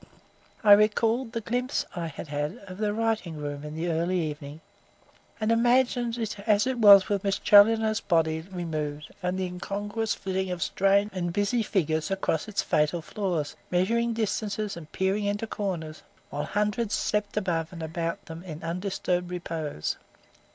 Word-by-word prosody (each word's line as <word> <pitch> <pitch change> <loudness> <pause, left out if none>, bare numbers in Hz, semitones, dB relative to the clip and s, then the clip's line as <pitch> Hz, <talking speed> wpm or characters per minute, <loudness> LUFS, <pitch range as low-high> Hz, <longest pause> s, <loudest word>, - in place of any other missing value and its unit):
I 210 - +6
recalled 225 +4 +4
the 230 -1 -3
glimpse 250 +4 -1
I 170 -2 -3
had 160 +1 -8
had 145 +1 -2
of 185 0 -9
the 210 -1 +1
writing 220 -7 -1
room 145 -1 -5
in 150 0 -7
the 165 +2 -2
early 170 +3 0
evening, 150 -2 -5 0.8
and 215 0 +1
imagined 240 0 +2
it 215 -3 -3
as 210 0 +2
it 260 -1 -1
was 200 -3 +9
with 200 -2 -1
Miss 195 -1 +1
Challoner's 220 +1 +5
body 160 -2 +1
removed 155 -5 -5
and 180 0 -1
the 190 - -1
incongruous 205 +4 -3
flitting 190 -1 -2
of 180 -1 -2
strange 200 +2 +2
and 175 -2 -2
busy 205 +6 +1
figures 160 -6 0
across 195 -4 -1
its 210 -2 -1
fatal 155 +1 +1
floors, 175 -6 -2
measuring 230 +6 +1
distances 215 -2 -2
and 160 -3 -10
peering 195 +2 0
into 205 +2 -1
corners, 175 -8 -4 0.3
while 145 +1 -2
hundreds 210 +1 0
slept 210 -1 -1
above 170 -5 -1
and 170 -3 -7
about 165 +1 -3
them 165 +1 -8
in 165 -3 -8
undisturbed 180 0 -2
repose. 165 - -3
190 Hz, 160 wpm, -27 LUFS, 165-210 Hz, 0.8 s, was